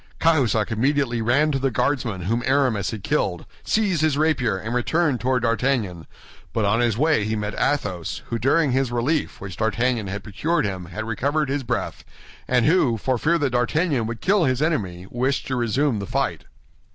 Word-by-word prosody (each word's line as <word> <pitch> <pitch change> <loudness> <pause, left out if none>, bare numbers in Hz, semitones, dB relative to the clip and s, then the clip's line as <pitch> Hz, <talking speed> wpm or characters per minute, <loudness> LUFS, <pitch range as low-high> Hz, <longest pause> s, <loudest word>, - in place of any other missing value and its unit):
Cahusac 125 -10 +2
immediately 125 0 +1
ran 140 +7 +2
to 135 - 0
the 135 0 +1
Guardsman 125 -5 -1
whom 115 +6 0
Aramis 130 -7 +2
had 110 -4 -6
killed, 105 - -1 0.2
seized 200 -7 +1
his 155 -3 +2
rapier, 140 -10 +1
and 110 +5 -5
returned 140 +2 +1
toward 125 -1 +1
D'Artagnan; 115 - 0 0.5
but 110 -2 +1
on 105 +3 +2
his 120 -3 +1
way 150 -4 +2
he 110 +1 -1
met 105 -1 -3
Athos, 95 - -2
who 115 - -1
during 140 +4 +2
his 130 -1 +1
relief 130 +6 -1
which 95 -2 -8
D'Artagnan 115 0 0
had 95 +1 -5
procured 150 - -1
him 95 -3 -4
had 90 +6 -6
recovered 140 +6 -1
his 140 +1 -1
breath, 125 -1 -3 0.4
and 125 -2 +2
who, 150 -8 +3
for 125 +3 -1
fear 170 +6 +2
that 145 -5 0
D'Artagnan 125 +1 +1
would 115 0 -6
kill 195 -2 +3
his 130 -2 +1
enemy, 100 - -1
wished 130 +3 -1
to 130 - -2
resume 125 +1 +1
the 100 - -5
fight. - - -2
125 Hz, 185 wpm, -23 LUFS, 110-145 Hz, 0.5 s, who